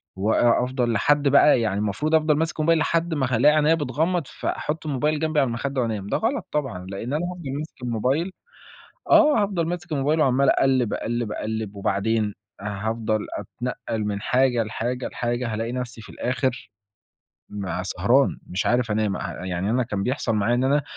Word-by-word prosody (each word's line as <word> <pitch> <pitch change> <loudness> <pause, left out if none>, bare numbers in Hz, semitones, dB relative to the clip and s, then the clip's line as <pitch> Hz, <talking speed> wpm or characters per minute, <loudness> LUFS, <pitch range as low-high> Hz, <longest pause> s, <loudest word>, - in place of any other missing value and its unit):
وأ 110 +5 +3
أفضل 125 -2 -1
لحد 145 +6 +2
بقى 140 -2 +6
يعني 105 -3 0
المفروض 105 +10 0
أفضل 155 -1 +3
ماسك 160 +1 -2
موبايل 165 +1 +3
لحد 165 +2 0
ما 135 -4 0
هالاقي 150 +6 +5
عينيا 155 +1 +4
بتغمّض، 160 +4 0
فأحُط 155 +1 -4
الموبايل 150 +2 0
جنبي 155 -1 +1
على 135 - +3
المخدة 130 +3 -2
وأنام، 110 -4 -2
ده - - 0
غلط 240 +6 -1
طبعًا، 130 -12 -3
لإن 115 +7 -5
أنا 160 +4 0
هافضل 175 -6 -5
ماسك 150 -4 -9
الموبايل 130 - 0 0.8
آه. 295 -9 +6
هافضل 185 -5 -1
ماسك 175 -1 -5
الموبايل 150 +2 +1
وعمَّال 135 0 +3
أقلّب، 130 -4 +2
أقلّب، 120 -2 -2
أقلّب 110 -1 -4
وبعدين 105 +2 0 0.3
هافضل 110 +2 -2
أتنقّل 120 -3 -4
من 105 -1 -2
حاجة، 125 -1 +2
لحاجة، 120 +3 -3
لحاجة، 120 -1 -2
هالاقي 115 +2 -2
نفسي 125 -2 -5
في - - -13
الآخِر 125 -2 -2 0.8
ما 95 -3 -4
سهران، 110 +9 +2
مش 95 +3 -2
عارف 120 -1 +2
أنام. 105 -2 0
أ 95 - -5
يعني 95 +2 -2
أنا 125 +2 +2
كان 105 -4 -3
بيحصل 125 -1 -1
معايا 105 +4 +2
إن 125 +1 +1
أنا 140 +2 +3
125 Hz, 170 wpm, -24 LUFS, 110-150 Hz, 0.8 s, بقى